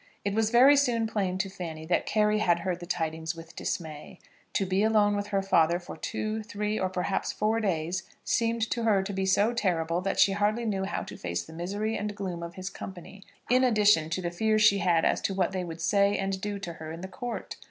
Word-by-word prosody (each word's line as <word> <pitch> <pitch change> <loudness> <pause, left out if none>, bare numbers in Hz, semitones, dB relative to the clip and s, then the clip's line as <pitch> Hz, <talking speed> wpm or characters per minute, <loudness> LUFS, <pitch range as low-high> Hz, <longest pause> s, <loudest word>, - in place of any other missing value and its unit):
It 200 - 0
was 220 0 +2
very 255 +5 +7
soon 245 -5 +2
plain 195 -4 -1
to 190 +1 -1
Fanny 170 -5 -7
that 175 +2 0
Carry 210 0 +2
had 175 -5 +2
heard 180 -1 -2
the 175 - -9
tidings 160 0 -2
with 165 0 -12
dismay. 160 +2 -5 0.4
To 195 - +1
be 190 +1 +1
alone 210 -1 +3
with 205 0 -2
her 195 -1 0
father 170 -3 +3
for 175 - -9
two, 215 +1 -3
three, 210 0 -3
or 185 - 0
perhaps 185 +1 -1
four 220 +2 0
days, 180 -3 -1 0.2
seemed 230 -1 +1
to 235 - 0
her 210 -4 +3
to 200 +1 -5
be 190 0 -1
so 205 +5 +3
terrible, 175 -6 0
that 195 +1 -2
she 195 - +6
hardly 210 +4 0
knew 195 -3 -1
how 195 - -3
to - - -9
face 85 0 -3
the - - -13
misery 200 +6 -2
and 205 0 -3
gloom 185 -4 -4
of 170 +1 -7
his 185 0 -5
company, 195 +1 -9 0.3
in 255 +2 +4
addition 210 -9 +4
to 180 +3 -2
the 175 - -2
fears 215 +4 +2
she 200 -1 +6
had 170 -2 +2
as - - +2
to 195 - -1
what 185 -2 +1
they 185 -1 -2
would 165 -2 -7
say 200 +3 +3
and 195 -1 -2
do 205 0 -3
to 180 -4 -6
her 160 -1 -8
in 165 +1 -7
the 190 - -5
Court. 245 +5 -6
195 Hz, 235 wpm, -28 LUFS, 175-210 Hz, 0.4 s, very